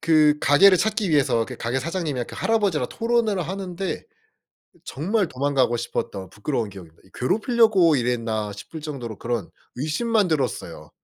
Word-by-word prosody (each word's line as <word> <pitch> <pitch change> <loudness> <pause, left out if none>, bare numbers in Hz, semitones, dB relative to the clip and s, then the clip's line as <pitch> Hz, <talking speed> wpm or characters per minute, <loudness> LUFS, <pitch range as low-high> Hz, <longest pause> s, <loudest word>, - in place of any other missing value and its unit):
그 155 -2 +4
가게를 185 +7 +6
찾기 215 -4 0
위해서 130 -6 +3
그 125 - -8
가게 120 +3 -2
사장님이랑 155 -6 -3
그 - - -9
할아버지랑 200 - +1
토론을 230 -4 0
하는데 190 +1 -4 0.8
정말 190 +7 -1
도망가고 130 -3 +1
싶었던 100 -5 -4
부끄러운 110 +2 -3
기억입니다. 90 -5 -13
이 95 - -21
'괴롭히려고 205 - +3
이랬나.' 115 -4 -1
싶을 150 +11 -9
정도로 125 -8 -6
그런 120 -2 -3 0.3
의심만 195 - +1
들었어요. 120 - -3
150 Hz, 380 characters per minute, -23 LUFS, 120-190 Hz, 0.8 s, 가게를